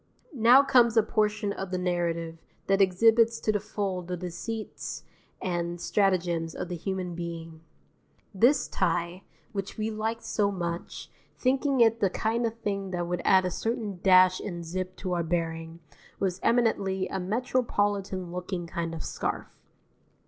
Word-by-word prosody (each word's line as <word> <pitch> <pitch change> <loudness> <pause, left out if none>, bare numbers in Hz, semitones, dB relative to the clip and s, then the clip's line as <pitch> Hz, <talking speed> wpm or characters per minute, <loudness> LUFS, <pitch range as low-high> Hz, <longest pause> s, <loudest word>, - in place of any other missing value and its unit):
Now 250 +2 +7
comes 240 -4 +4
a 225 - +6
portion 210 -1 0
of 195 -1 -5
the 185 - -2
narrative 170 -2 -1 0.3
that 195 0 +3
exhibits 225 +4 +4
to 215 - +2
the 210 - 0
full 200 -2 -3
the 180 +1 -5
deceits 185 +6 -5 0.4
and 175 -1 -2
stratagems 175 -4 +1
of 180 - -5
the 175 - -3
human 185 0 -3
being. 165 -1 -6 0.7
This 240 +9 +4
tie, 175 +2 -1 0.3
which 195 -3 -5
we 220 0 -1
liked 220 +2 -3
so 205 -2 +1
much, 170 -2 -5 0.3
thinking 270 0 +2
it 225 0 +5
the 195 - +3
kind 230 +5 0
of 225 - -5
thing 195 -1 -2
that 175 -1 -2
would 175 0 -2
add 190 -1 +5
a 180 - -1
certain 220 -3 -3
dash 185 -1 +6
and 175 -4 -5
zip 185 +2 -4
to 185 -1 -3
our 175 - +1
bearing, 165 0 -3 0.4
was 190 -2 -1
eminently 200 -5 +1
a - - -3
metropolitan 205 -3 -1
looking 180 0 -4
kind 165 0 -4
of 160 - -6
scarf. - - -3
190 Hz, 155 wpm, -28 LUFS, 175-220 Hz, 0.7 s, Now